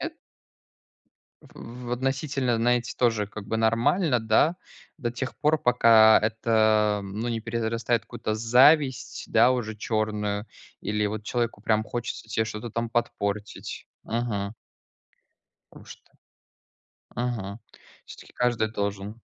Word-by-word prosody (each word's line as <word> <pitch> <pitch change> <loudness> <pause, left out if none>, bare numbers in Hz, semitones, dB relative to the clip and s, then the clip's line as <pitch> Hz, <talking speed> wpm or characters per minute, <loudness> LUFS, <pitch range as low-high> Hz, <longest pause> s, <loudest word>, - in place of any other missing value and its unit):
Эт - - -5 1.2
В 120 +1 -11
в 120 - -2
относительно, 135 -1 -1
знаете, 120 +1 +1
тоже 115 -4 +2
как 105 -1 -9
бы 110 - -1
нормально 120 - +2
да, 110 +10 +2 0.4
до 120 -4 -3
тех 130 +1 -5
пор, 155 +1 +2
пока 115 -3 +6
это, 110 -1 +2
ну, 105 +5 -4
не 115 -1 -2
перерастает 115 +1 -1
в - - -23
какую-то 110 - -3
зависть, 130 +5 +3
да, 125 - +5
уже 110 -4 -3
чёрную. 105 -1 -2 0.3
Или 105 0 -1
вот 110 +1 -4
человеку 120 -2 -2
прям 110 -1 +1
хочется 120 -1 -5
тебе 110 0 0
что-то 110 +1 -6
там 115 +1 -2
подпортить. 105 -3 -3 0.2
Мгм. 110 -4 -2 1.2
Потому - - -14
что. - - -14 1.0
Мгм. 115 -4 -3 0.5
Всё-таки - - -13
каждый 120 -3 0
должен. 100 +2 -4
115 Hz, 125 wpm, -26 LUFS, 110-120 Hz, 1.2 s, пока